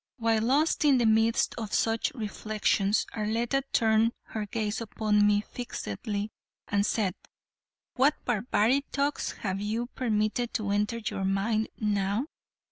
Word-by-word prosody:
While 225 -2 +2
lost 280 +9 +2
in 285 -3 +5
the 240 - +2
midst 225 +1 +3
of 215 -2 -3
such 225 0 +1
reflections 215 -2 0
Arletta 230 +5 0
turned 225 +1 +3 0.2
her 215 -2 -4
gaze 215 0 -2
upon 210 -1 +2
me 205 0 +3
fixedly 210 - -5 0.4
and 200 0 +1
said: 200 -5 0 0.8
"What 275 +4 +4
barbaric 240 +3 +2
thoughts 285 +1 -1
have 195 -1 -1
you 220 +3 -1
permitted 225 0 -1
to 210 -4 -1
enter 210 +3 0
your 210 -3 -3
mind 205 +3 0
now?" 205 +2 0
220 Hz, 130 wpm, -28 LUFS, 205-235 Hz, 0.8 s, in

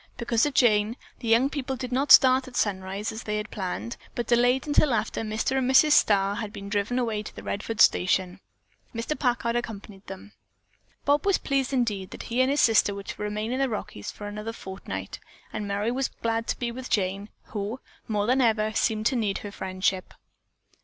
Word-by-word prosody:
Because 235 +2 +1
of 285 - -5
Jane, 220 -1 +3 0.2
the 235 - -6
young 230 +4 +4
people 275 -2 -3
did 255 -1 -6
not 270 +3 +1
start 260 0 +7
at 255 - -11
sunrise 195 0 -1
as 220 - -6
they 210 -2 -3
had 210 0 -5
planned, 200 +4 -4 0.2
but 240 - -2
delayed 245 +3 +3
until 290 -3 +3
after 215 - -2
Mr. 220 +5 -1
and 255 -1 0
Mrs. 300 +3 +6
Starr 200 -6 +4
had 215 -3 -4
been 200 -1 -8
driven 210 +4 -1
away 225 -4 -1
to 210 - -10
the - - -9
Redfords 215 +2 -2
station. 185 +1 +2 0.6
Mr. 230 +6 -2
Packard 235 -3 0
accompanied 205 -4 -6
them. 195 +2 -9 0.7
Bob 290 +1 +3
was 395 -1 +3
pleased 275 -2 -1
indeed 215 -8 -1
that - - -8
he 250 - +3
and 260 - +3
his 285 +1 +2
sister 215 -3 +4
were 200 - -7
to - - -8
remain 210 +2 -3
in 255 - -1
the 270 -1 +1
Rockies 205 - -5
for 205 - -8
another 210 +2 -5
fortnight, 190 -3 -7 0.3
and 205 - -4
Merry 205 +3 -1
was 260 +2 0 0.2
glad 230 0 0
to - - -1
be 240 -1 -2
with 255 +2 -7
Jane, 195 +1 -1 0.2
who, 210 +4 -3 0.3
more 210 -3 0
than 255 +4 +3
ever, 215 -2 +2
seemed 215 0 0
to 260 - +2
need 210 -5 0
her 205 - -6
friendship. 185 -1 -2
225 Hz, 200 wpm, -26 LUFS, 205-250 Hz, 0.7 s, start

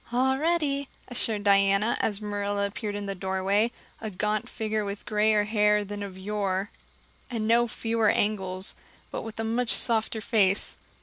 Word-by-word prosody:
"All 265 +2 +2
ready," 295 -4 +1 0.2
assured 225 -4 0
Diana, 200 +2 +4
as 205 -2 -1
Marilla 205 -1 -1
appeared 205 +1 -4
in 205 0 -4
the 200 - -3
doorway, 195 +4 0 0.3
a 220 - -3
gaunt 210 +2 -1
figure 215 -1 -2
with 200 0 -5
grayer 210 0 +3
hair 210 -1 +2
than 205 +1 -6
of 195 -2 -6
yore 195 0 -2 0.6
and 225 -3 -2
no 235 +1 +4
fewer 225 -1 +1
angles, 190 -3 0 0.4
but - - -3
with 225 0 -8
a - - 0
much 230 +2 0
softer 225 -2 +3
face. 205 -3 +1
210 Hz, 160 wpm, -27 LUFS, 200-225 Hz, 0.6 s, Diana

